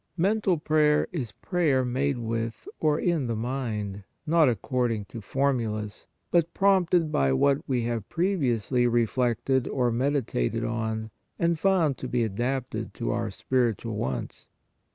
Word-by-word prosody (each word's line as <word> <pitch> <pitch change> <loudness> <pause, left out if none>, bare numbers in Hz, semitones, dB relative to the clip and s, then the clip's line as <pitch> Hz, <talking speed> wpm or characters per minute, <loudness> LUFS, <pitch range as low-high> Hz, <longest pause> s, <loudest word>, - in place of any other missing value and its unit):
Mental 195 0 +2
prayer 150 -1 +3
is 135 - -4
prayer 135 - +1
made 135 +2 0
with 115 - -3
or 150 -1 +2
in 165 -8 0
our 115 - 0
mind, 110 -5 -3 0.2
not 160 -3 +4
according 120 -3 -1
to 115 - -9
formulas, 110 -4 -1 0.2
but 170 -1 +2
prompted 180 -5 +3
by 70 - +2
what 140 - +3
we 125 -3 +1
have 115 -3 -3
pre 185 +4 +1
viously 120 - +1
reflected 120 +2 +1
or 125 -3 +1
meditated 125 - 0
on 110 -1 -2 0.3
and 170 -1 +1
found 170 -7 +2
to 130 - -4
be 120 -1 +1
adapted 115 -1 -3
to 120 - -2
our 115 -2 -1
spiritual 115 +1 -1
wants. 65 - -4
125 Hz, 140 wpm, -27 LUFS, 115-150 Hz, 0.3 s, not